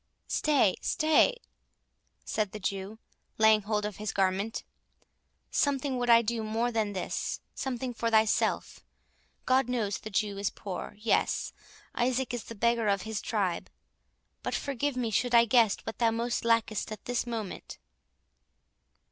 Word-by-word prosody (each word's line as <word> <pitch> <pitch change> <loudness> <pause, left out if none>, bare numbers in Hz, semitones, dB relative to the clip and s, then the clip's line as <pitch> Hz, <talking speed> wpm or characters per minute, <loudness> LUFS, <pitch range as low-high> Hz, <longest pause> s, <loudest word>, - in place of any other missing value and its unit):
"Stay, 275 -11 +2
stay," 315 +10 +3 0.9
said 210 -3 -1
the 215 - -5
Jew, 195 +2 -3 0.4
laying 220 -1 +5
hold 210 0 -1
of 210 -2 -5
his 210 -1 -3
garment; 195 +3 0 0.9
"something 275 -2 +1
would 245 0 -1
I 230 0 +7
do 230 +1 -1
more 225 +3 0
than 220 -3 0
this, 185 -2 -3
something 255 -1 -3
for 230 0 -1
thyself.—God 230 +3 0
knows 210 -7 -1
the 215 - -7
Jew 205 -1 -1
is 200 - 0
poor—yes, 205 +3 -2 0.4
Isaac 250 +1 0
is 240 - -4
the 230 - -8
beggar 235 +1 +2
of 200 -2 +1
his 220 -2 -4
tribe—but 195 -6 -5
forgive 280 0 -2
me 235 -3 -1
should 245 +3 +1
I 235 0 +7
guess 225 -3 +4
what 225 - -6
thou 230 -1 +4
most 235 +1 -1
lackest 230 -2 +1
at 215 - -8
this 245 0 -1
moment." 225 -5 -5
225 Hz, 140 wpm, -29 LUFS, 210-245 Hz, 0.9 s, I